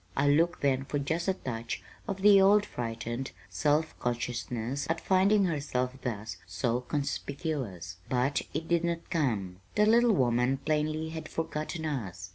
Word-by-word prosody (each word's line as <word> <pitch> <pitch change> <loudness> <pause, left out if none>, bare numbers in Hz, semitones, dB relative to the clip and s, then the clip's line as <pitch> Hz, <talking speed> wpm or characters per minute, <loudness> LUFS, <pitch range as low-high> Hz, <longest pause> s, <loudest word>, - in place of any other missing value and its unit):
I 140 +1 +3
looked 165 +4 +3
then 135 -1 +2
for 145 - -2
just 160 +5 -1
a 190 - +2
touch 115 -7 -5 0.2
of 195 0 -4
the 200 -1 +8
old 205 +2 +6
frightened, 120 - -4 0.2
self 155 +2 +1
consciousness 120 +1 -2
at 165 0 +1
finding 195 +3 +4
herself 140 -6 -1
thus 110 -3 -4
so 115 +7 -1
conspicuous; 135 - -3
but 130 +3 +1
it 160 +2 -3
did 170 0 +2
not 170 -1 -2
come. 110 - 0 0.2
The 210 - +5
little 235 +1 +5
woman 125 -3 +2
plainly 155 +2 -1
had 160 -1 -6
forgotten 160 0 -3
us. 95 - -4
140 Hz, 150 wpm, -30 LUFS, 120-165 Hz, 0.2 s, the